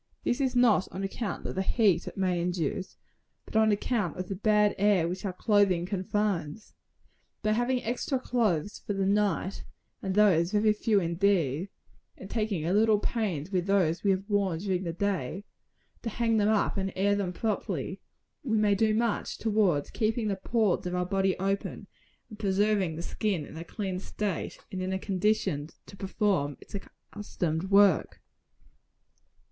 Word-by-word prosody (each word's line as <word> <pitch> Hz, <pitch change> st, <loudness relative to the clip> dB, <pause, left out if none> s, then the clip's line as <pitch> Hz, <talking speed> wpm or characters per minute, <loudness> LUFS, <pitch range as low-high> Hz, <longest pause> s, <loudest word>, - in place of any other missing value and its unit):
This 245 Hz, -, 0 dB
is 260 Hz, -2 st, 0 dB
not 240 Hz, -6 st, +4 dB
on 195 Hz, -, -5 dB
account 200 Hz, +1 st, -4 dB
of -, -, -3 dB
the 190 Hz, -, -1 dB
heat 195 Hz, -4 st, +2 dB
it -, -, -7 dB
may 180 Hz, -2 st, +1 dB
induce, 175 Hz, +1 st, -2 dB, 0.5 s
but -, -, -13 dB
on 220 Hz, 0 st, +5 dB
account 205 Hz, -4 st, -1 dB
of 185 Hz, 0 st, -5 dB
the 195 Hz, -, -2 dB
bad 210 Hz, +1 st, +3 dB
air 200 Hz, -4 st, +3 dB
which 180 Hz, +4 st, -4 dB
our 195 Hz, -, -1 dB
clothing 195 Hz, -3 st, +2 dB
confines. 195 Hz, -1 st, -2 dB, 0.7 s
By 215 Hz, -, +2 dB
having 245 Hz, +3 st, +1 dB
extra 245 Hz, +3 st, -1 dB
clothes 210 Hz, -8 st, 0 dB
for 205 Hz, -, -2 dB
the 195 Hz, -1 st, 0 dB
night, 200 Hz, -1 st, 0 dB, 0.4 s
and 190 Hz, -1 st, -2 dB
those 190 Hz, -3 st, +4 dB
very 210 Hz, 0 st, +4 dB
few 210 Hz, -1 st, +2 dB
indeed, 170 Hz, -2 st, +1 dB, 0.5 s
and 190 Hz, -, -10 dB
taking 210 Hz, -8 st, -1 dB
a 175 Hz, -, +1 dB
little 215 Hz, +1 st, +4 dB
pains 195 Hz, -7 st, -2 dB
with 180 Hz, -1 st, 0 dB
those 185 Hz, -4 st, +2 dB
we 200 Hz, -, +2 dB
have 195 Hz, +1 st, 0 dB
worn 200 Hz, -5 st, +1 dB
during 185 Hz, 0 st, -2 dB
the 170 Hz, -, -1 dB
day 190 Hz, -2 st, -2 dB, 0.6 s
to 230 Hz, -, -3 dB
hang 225 Hz, 0 st, +1 dB
them 210 Hz, 0 st, +3 dB
up 215 Hz, -1 st, +1 dB
and 195 Hz, 0 st, -1 dB
air 200 Hz, +2 st, +2 dB
them 195 Hz, -3 st, -1 dB
properly 215 Hz, +3 st, -3 dB, 0.4 s
we 225 Hz, -5 st, +1 dB
may 210 Hz, -1 st, +3 dB
do 215 Hz, +2 st, +2 dB
much 230 Hz, -1 st, -1 dB
towards 205 Hz, -9 st, +1 dB
keeping 220 Hz, 0 st, 0 dB
the 200 Hz, -, 0 dB
pores 210 Hz, -2 st, 0 dB
of 180 Hz, -, -2 dB
our 180 Hz, 0 st, 0 dB
bodies 195 Hz, +1 st, +1 dB
open, 195 Hz, +1 st, -2 dB, 0.4 s
and 215 Hz, -2 st, -12 dB
preserving 200 Hz, -3 st, +1 dB
the 165 Hz, -, -5 dB
skin 190 Hz, -8 st, -2 dB
in -, -, -12 dB
a 165 Hz, -, -6 dB
clean 190 Hz, +1 st, -4 dB
state, 200 Hz, -1 st, -4 dB
and 190 Hz, -2 st, -4 dB
in 185 Hz, +1 st, -2 dB
a -, -, 0 dB
condition 190 Hz, -6 st, 0 dB, 0.2 s
to -, -, -12 dB
perform 190 Hz, -7 st, 0 dB
its -, -, -16 dB
accustomed 190 Hz, -4 st, -4 dB
work. 195 Hz, -3 st, +4 dB
200 Hz, 170 wpm, -28 LUFS, 180-215 Hz, 0.7 s, on